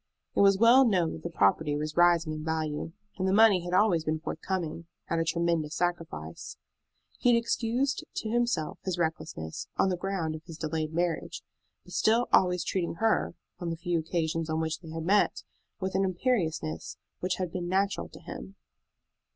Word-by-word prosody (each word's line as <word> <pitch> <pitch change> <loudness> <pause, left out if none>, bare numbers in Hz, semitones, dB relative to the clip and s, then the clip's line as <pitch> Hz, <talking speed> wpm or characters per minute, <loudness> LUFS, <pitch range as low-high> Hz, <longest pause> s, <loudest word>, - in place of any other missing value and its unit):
It - - +1
was 195 -1 +6
well 235 +5 +7
known 185 -9 +2
that - - -8
the 170 - -4
property 145 +2 +2
was 150 +1 -3
rising 170 -2 +4
in 155 0 -5
value, 160 0 -2 0.3
and 190 - +1
the - - +2
money 205 -3 +6
had 175 - -5
always 185 -5 +4
been 155 0 -1
forthcoming, 165 0 -4 0.2
at 165 - 0
a - - +2
tremendous 165 -2 0
sacrifice. 165 - -3 0.6
He 245 - +4
had - - +5
excused 235 +3 0
to 220 - -3
himself 235 -10 0
his 185 -2 -2
recklessness 160 - -3
on 190 - +3
the 180 - -1
ground 175 -4 -2
of 155 0 -8
his 165 -3 -9
delayed 155 -1 -2
marriage, 170 +1 -2 0.4
but - - -13
still 230 +3 +3
always 180 -2 +4
treating 170 -2 -2
her, 220 +4 +1 0.2
on 175 -2 -3
the 165 - -3
few 170 0 0
occasions 160 0 -1
on 160 0 0
which 160 0 -2
they 165 - -12
had 160 0 -5
met, 200 +3 +2 0.4
with 190 -1 -2
an 190 +1 +2
imperiousness 175 - -1 0.2
which 185 0 -1
had 180 -3 -3
been 175 -1 -4
natural 195 +2 0
to - - -13
him. 60 +1 -8
170 Hz, 185 wpm, -29 LUFS, 160-190 Hz, 0.6 s, well